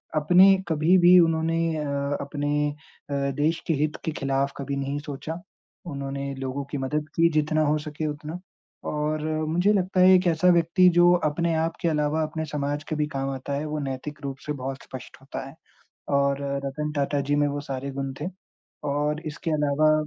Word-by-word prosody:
अपने 180 +6 +6
कभी-भी 175 +3 +5
उन्होंने 165 -1 +2 0.2
अ, 140 -1 -2
अपने 145 +1 -1 0.4
अ, - - -3 0.3
देश 160 +2 +2
के 165 - +2
हित 155 0 -1
के 160 - 0
खिलाफ़ 135 0 0
कभी 140 0 -3
नहीं 140 +1 -2
सोचा। 150 +3 -6 0.5
उन्होंने 140 -1 -4
लोगों 135 +1 -4
की 145 - -2
मदद 145 +3 -2
की 165 0 +4
जितना 155 +1 +2
हो 150 +1 +2
सके 150 +1 -5
उतना 150 +3 -5 0.5
और 150 0 -1 0.3
मुझे 175 +6 +3
लगता 185 -1 0
है 185 0 +7
एक 185 0 +4
ऐसा 165 +1 +2
व्यक्ति 170 +2 +4
जो 175 0 +7 0.2
अपने 170 +2 0
आप 165 +1 0
के - - +1
अलावा 150 0 +1
अपने 160 +1 -3
समाज 145 0 -3
के 155 - -1
भी 150 0 0
काम 135 0 -1
आता 135 +1 -4
है, 145 +2 -2
वो 150 0 -3
नैतिक 140 +2 -5
रूप 135 -1 -4
से 150 - -2
बहुत 135 0 -5
स्पष्ट 130 - -10
होता 135 - -6
है 135 - -12 0.6
और 140 0 +1 0.2
रतन 150 +2 -3
टाटा 140 0 0
जी 145 - +3
में 145 0 +3
वो 145 0 -3
सारे 135 +1 -3
गुण 135 0 -4
थे 155 - -2 0.6
और 150 +2 0
इसके 160 +2 -4
अलावा 150 0 +3
150 Hz, 185 wpm, -25 LUFS, 140-160 Hz, 0.6 s, है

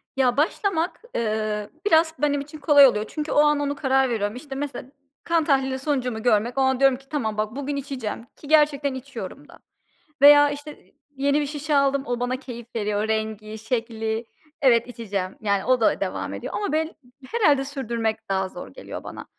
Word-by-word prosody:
Ya, 255 -2 +2
başlamak, 335 +3 0
eee, 215 -2 -1 0.2
biraz 320 -4 +4
benim 285 -1 +1
için 295 +2 -10
kolay 285 -3 +7
oluyor 210 -4 0
çünkü 305 +5 -4
o - - +3
an 295 0 +4
onu 285 0 -1
karar 265 -2 +2
veriyorum. 210 -2 -1
İşte, 270 +2 -8
mesela 275 -3 -5 0.4
kan 335 -1 +2
tahlili 265 -3 +1
sonucumu 255 -6 -2
görmek 235 +1 +2
o - - +3
an 265 -1 +2
diyorum 270 -2 +4
ki 270 +1 -22
"Tamam 220 -8 -2
bak, 215 +2 -2
bugün 285 +1 -3
içeceğim" 260 -5 -5
ki 290 - -13
gerçekten 295 -2 +3
içiyorum 260 +2 -8
da. - - -16 0.6
Veya, 290 0 +8
işte, 290 +1 -9 0.2
yeni 280 +2 +1
bir - - -1
şişe 295 +1 -2
aldım; 275 -1 +2
o, 245 0 -2
bana 245 +1 -1
keyif 240 -3 -9
veriyor 210 -1 -1
rengi, 220 0 -3
şekli. 225 0 -3 0.4
Evet, 240 -4 +4
içeceğim, 200 -6 -4
yani, 200 -2 0
o 255 -1 +3
da 220 - +3
devam - - -3
ediyor. - - -6
Ama 410 -7 -2
bel 315 +2 -1 0.4
herhâlde 300 -12 +3
sürdürmek 235 -7 -3
daha 190 -1 0
zor 180 - -9
geliyor 90 - -9
bana. - - -8
265 Hz, 185 wpm, -24 LUFS, 220-290 Hz, 0.6 s, Veya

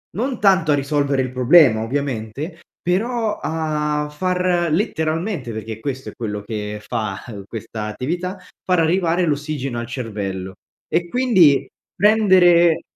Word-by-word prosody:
non 250 +3 -2
tanto 190 -6 +4
a - - +5
risolvere 140 -1 0
il 130 -1 -3
problema, 125 -2 +5
ovviamente, 140 - -4 0.2
però 220 +4 0
a 150 -2 -1
far 180 +1 0
letteralmente, 160 - -1
perché 110 0 -6
questo 130 -2 -4
è - - -11
quello 105 -4 -4
che 105 -1 -5
fa 105 -4 -3 0.3
questa 110 -1 -6
attività, 175 - -3 0.3
far 180 -2 +2
arrivare 170 +1 +2
l'ossigeno 145 -5 -2
al 120 - -4
cervello, 100 -6 -5 0.3
e 170 +1 0
quindi 190 - +4 0.3
prendere 185 -6 +5
150 Hz, 125 wpm, -20 LUFS, 120-180 Hz, 0.3 s, a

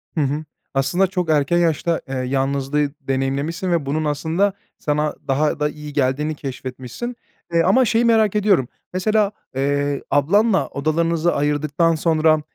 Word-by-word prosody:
Hı 160 - +1
hı. 145 +2 -1 0.3
Aslında 175 +8 +2
çok 180 -3 -2
erken 150 +2 +2
yaşta, 165 0 +1
eee, 135 - -4
yalnızlığı 135 +2 0
deneyimlemişsin 140 +7 -1
ve 165 -4 +1
bunun 155 +3 -1
aslında 160 +7 0 0.3
sana 150 0 0
daha 145 +2 +1
da 150 0 +1
iyi 150 -1 -9
geldiğini 145 +3 0
keşfetmişsin. 130 - -6 0.4
Eee, 170 - +4
ama 255 +8 +4
şeyi 230 +1 +2
merak 220 -3 +3
ediyorum, 200 - +3 0.3
mesela, 210 +2 +2 0.2
eee, 140 +1 0
ablanla 190 - +3
odalarınızı 165 +3 0
ayırdıktan 150 +3 +1
sonra, 155 -1 +3
155 Hz, 140 wpm, -21 LUFS, 140-175 Hz, 0.4 s, Eee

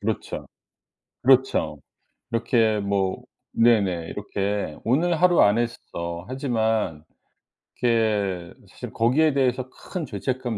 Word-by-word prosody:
그렇죠. 110 +1 -3 0.8
그렇죠. 130 +1 +3 0.5
이렇게 115 -2 +2
뭐 100 -2 -1 0.3
네네 100 -8 +2
이렇게 100 -5 -3
'오늘 160 +7 +1
하루 180 -1 +5
안 105 +2 +5
했어.' 85 -7 -4
하지만 110 - -1 0.8
이렇게 105 -7 0 0.2
사실 - - -9
거기에 140 +7 +3
대해서 130 -1 0
큰 175 +4 -6
죄책감 125 +1 -3
115 Hz, 225 characters per minute, -24 LUFS, 100-130 Hz, 0.8 s, 하루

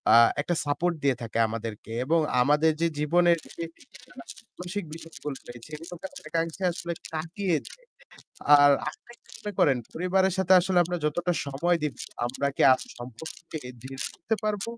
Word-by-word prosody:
আ - - +9 0.2
একটা 175 +3 -1
সাপোর্ট 170 +4 0
দিয়ে 135 -3 +3
থাকে 115 0 -4
আমাদেরকে 115 0 -6
এবং 165 +3 +3 0.2
আমাদের 150 +4 +4
যে 170 - +4
জীবনের 170 +3 +4 1.2
মানসিক 180 +1 -4
বিষয়গুলো 160 -3 -7
রয়েছে 120 +3 -10
সেগুলোকে 175 - -8
অনেকাংশে 165 +3 -3
আসলে 170 0 -4 0.2
কাটিয়ে 170 +2 -1
দেয়। - - -13 0.8
আর 145 0 +8 0.2
আপনি 240 - -16
কি - - -38
মনে 210 0 -5
করেন 135 -3 +5 0.2
পরিবারের 190 +2 +2
সাথে 190 0 +3
আসলে 185 0 +1
আমরা 175 +1 -2
যতটা 175 +4 0
সময় 170 +6 +1
দিব 150 -5 -1 0.3
আমরা 140 +3 -1
কি - - +2
আ - - +7 0.2
সম্পর্ককে 155 +7 -8 0.2
দৃঢ় 135 0 -8
করতে 225 - -2
পারব? 210 -2 0
165 Hz, 150 wpm, -27 LUFS, 140-175 Hz, 1.2 s, আ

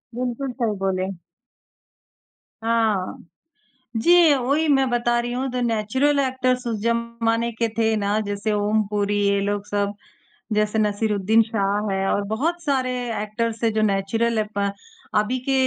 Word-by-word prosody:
बिल्कुल 250 +2 -3
सही 220 -3 +1
बोले। 190 0 -1 1.5
हाँ, 225 -5 +1 0.8
जी 340 +5 +6
वही 280 +4 +1
मैं 270 -3 +3
बता 240 0 +1
रही 240 0 -2
हूँ 260 +2 -2
तो 250 0 -2
नेचुरल 240 +5 +1
एक्टर्स 255 -1 0
उस 225 -3 -2
जमाने 235 0 0
के 230 0 -1
थे 225 -1 +2
ना 205 +1 0
जैसे 205 +1 -2
ओम 210 +1 +2
पूरी 205 0 0
ये 200 0 +2
लोग 205 0 -2
सब, 205 0 -1 0.6
जैसे 210 +1 +1
नसीरुद्दीन 210 0 +2
शाह 210 -2 -1
है 195 0 0
और 205 - +1
बहुत 335 +10 -1
सारे 270 -5 0 0.3
एक्टर्स 220 +1 -3
हैं 225 - +2
जो 215 - +1
नेचुरल 215 +3 +1
अप 210 -1 -7 0.6
अभी 215 +5 +1
के - - +3
225 Hz, 145 wpm, -23 LUFS, 205-245 Hz, 1.5 s, जी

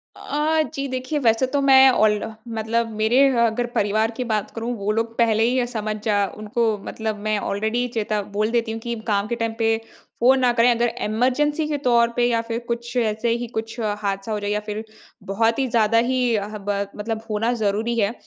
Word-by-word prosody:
अ, 310 +2 0
जी 275 -2 -3
देखिए, 255 +3 -3
वैसे 230 0 +3
तो 285 - +2
मैं 265 -1 +7
ऑल 215 -4 +3 0.4
मतलब 225 +1 0
मेरे 220 +4 +2 0.3
अगर 230 +2 0
परिवार 215 +2 +1
की 250 - -1
बात 210 -2 -1
करूँ, 230 +2 -3
वो 205 +1 -1
लोग 225 +1 -2
पहले 225 -2 +3
ही 245 +2 +2
ये 245 - +2
समझ 215 -3 -3
जा 205 -2 +2
उनको 215 +1 0
मतलब 220 -2 -4
मैं 215 -1 +1
ऑलरेडी 220 +5 -1
चेता 215 -2 -1
बोल 215 +2 +1
देती 230 -2 0
हूँ 225 - -4
कि 235 +1 -4
काम 205 -1 +1
के 235 - -2
टाइम 230 -1 -2
पे 225 0 +2 0.4
फ़ोन 260 +3 +5
ना 250 -1 +3
करें। 240 0 +4
अगर 235 0 +1 0.2
इमरजेंसी 270 +8 +1
के 295 - -1
तौर 235 -1 +4
पे 240 - +2
या 230 -1 +1
फिर 230 0 -4
कुछ 235 +1 -4
ऐसे 220 0 0
ही 240 0 -5
कुछ 225 +1 -5
हादसा 205 -1 -2
हो 210 - -1
जाए 205 0 -3
या 210 0 0
फिर 210 +1 -4 0.5
बहुत 225 +4 +1
ही 265 - +1
ज़्यादा 230 -1 +2
ही 250 -3 +1
हब 205 0 -4 0.3
मतलब 220 +1 -4
होना 215 +3 0
ज़रूरी 215 +4 0
है 205 +2 +1
225 Hz, 205 wpm, -22 LUFS, 215-245 Hz, 0.5 s, मैं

